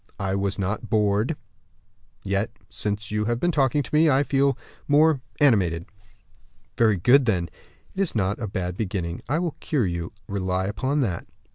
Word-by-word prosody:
"I 95 -1 -1
was 100 0 -1
not 100 +2 -3
bored; 105 +5 +2 0.9
yet 100 +3 0 0.2
since 105 +1 -3
you 105 0 0
have 120 +1 0
been 175 - +2
talking 145 -1 +2
to - - -11
me, 155 +1 +5
I 140 0 +4
feel 140 -1 +2 0.3
more 150 -1 +4 0.2
animated." 95 - +3 0.9
"Very 110 -3 +4
good, 125 +9 +5
then; 90 -5 +1 0.4
that 195 - -2
is 190 - -1
not 100 -1 0
a 110 - -2
bad 90 -2 -3
beginning. 90 -5 -3
I 150 - +2
will 170 -2 -2
cure 140 -8 0
you, 85 -2 -3 0.2
rely 95 -1 -1
upon 135 +8 -1
that." 95 -10 -2
105 Hz, 165 wpm, -24 LUFS, 95-140 Hz, 0.9 s, me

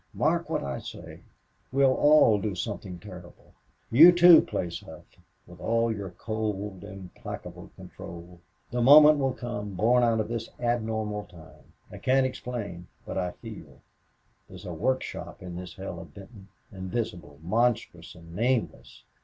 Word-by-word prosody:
Mark - - 0
what - - -1
I 70 -1 -4
say. - - -10 0.5
We'll 135 0 +4
all 145 -8 +5
do 105 -3 -2
something 95 -2 -5
terrible. 90 -1 -13 0.4
You, 160 +10 +9
too, 175 -1 +8
Place 85 -1 -4
Hough, - - -13 0.4
with 90 0 -15
all 115 +3 +1
your 100 -2 -6
cold, 105 -1 -4
implacable 95 -3 -9
control. 85 +1 -11 0.3
The 120 - -1
moment 150 +3 +8
will 135 -2 0
come, 110 -6 -6
born 120 +6 +3
out 115 -2 +2
of 110 - -1
this 115 0 -4
abnormal 110 -3 -2
time. 80 -4 -17 0.2
I - - -9
can't 130 +1 +2
explain, 110 -9 -5 0.2
but - - -6
I 90 -1 -1
feel. - - -11 0.7
There's - - -11
a - - -5
work 130 0 0
shop - - -8
in 90 -1 -7
this 90 -1 -8
hell 95 -3 -7
of 85 -4 -12
Benton. 100 0 -13 0.2
Invisible, 95 -6 -5
monstrous, 110 -4 -1
and 85 -1 -13
nameless!... 120 +3 -2
105 Hz, 150 wpm, -27 LUFS, 90-120 Hz, 0.7 s, You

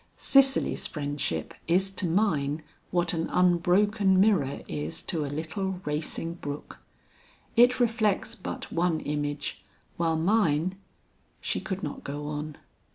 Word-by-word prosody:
Cicely's 270 0 +4
friendship 145 - -3
is 190 +3 +2
to 190 -1 -2
mine 160 -5 +1 0.3
what 175 -1 +1
an 165 -1 -1
unbroken 185 +3 +3
mirror 185 -10 +3
is 75 +1 -4
to 160 -3 -2
a - - -3
little 170 +6 -3
racing 155 +2 -2
brook. 145 -4 -7 0.8
It 245 +2 +6
reflects 225 -2 +1
but 220 - -6
one 170 -1 +1
image, 145 0 -3 0.3
while 165 -1 +1
mine 175 -2 +2 0.4
" - - -39
She - - -2
could 195 -2 -5
not 145 - -5
go 145 +1 -5
on. 150 0 -5
170 Hz, 130 wpm, -28 LUFS, 150-195 Hz, 0.8 s, It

